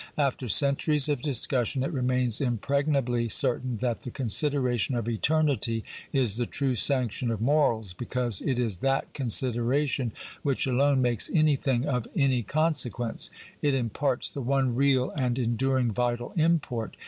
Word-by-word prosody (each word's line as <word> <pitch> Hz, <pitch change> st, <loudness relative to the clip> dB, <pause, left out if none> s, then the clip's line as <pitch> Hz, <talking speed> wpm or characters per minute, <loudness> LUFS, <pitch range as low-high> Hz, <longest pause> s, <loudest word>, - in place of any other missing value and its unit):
After 135 Hz, -4 st, -1 dB
centuries 140 Hz, -, +3 dB
of 145 Hz, -4 st, 0 dB
discussion 130 Hz, -1 st, +1 dB
it -, -, -2 dB
remains 125 Hz, -3 st, 0 dB
impregnably 130 Hz, -1 st, 0 dB
certain 125 Hz, +2 st, +2 dB
that 120 Hz, -2 st, -1 dB
the -, -, -7 dB
consideration 125 Hz, -1 st, 0 dB
of 115 Hz, -2 st, -3 dB
eternity 120 Hz, -2 st, +1 dB, 0.3 s
is 125 Hz, -7 st, 0 dB
the 120 Hz, -1 st, -1 dB
true 135 Hz, -2 st, -1 dB
sanction 125 Hz, -1 st, +1 dB
of 115 Hz, -2 st, -2 dB
morals, 115 Hz, -6 st, +1 dB
because 120 Hz, +1 st, -1 dB
it 130 Hz, -3 st, -1 dB
is 110 Hz, -7 st, 0 dB
that 135 Hz, +3 st, -1 dB
consideration 125 Hz, +1 st, 0 dB, 0.3 s
which 140 Hz, -3 st, 0 dB
alone 135 Hz, +1 st, +2 dB
makes 120 Hz, -3 st, +2 dB
anything 140 Hz, -5 st, +1 dB
of 125 Hz, -5 st, -2 dB
any 135 Hz, -4 st, +2 dB
con 155 Hz, -, +1 dB
sequence. 120 Hz, -4 st, -2 dB, 0.3 s
It 145 Hz, -2 st, +1 dB
imparts 130 Hz, +1 st, -1 dB
the 140 Hz, -, -5 dB
one 135 Hz, 0 st, 0 dB
real 130 Hz, 0 st, +2 dB
and 125 Hz, -4 st, -1 dB
enduring 125 Hz, 0 st, 0 dB
vital 120 Hz, +1 st, -2 dB
import. 155 Hz, -, 0 dB
130 Hz, 145 wpm, -27 LUFS, 120-140 Hz, 0.3 s, centuries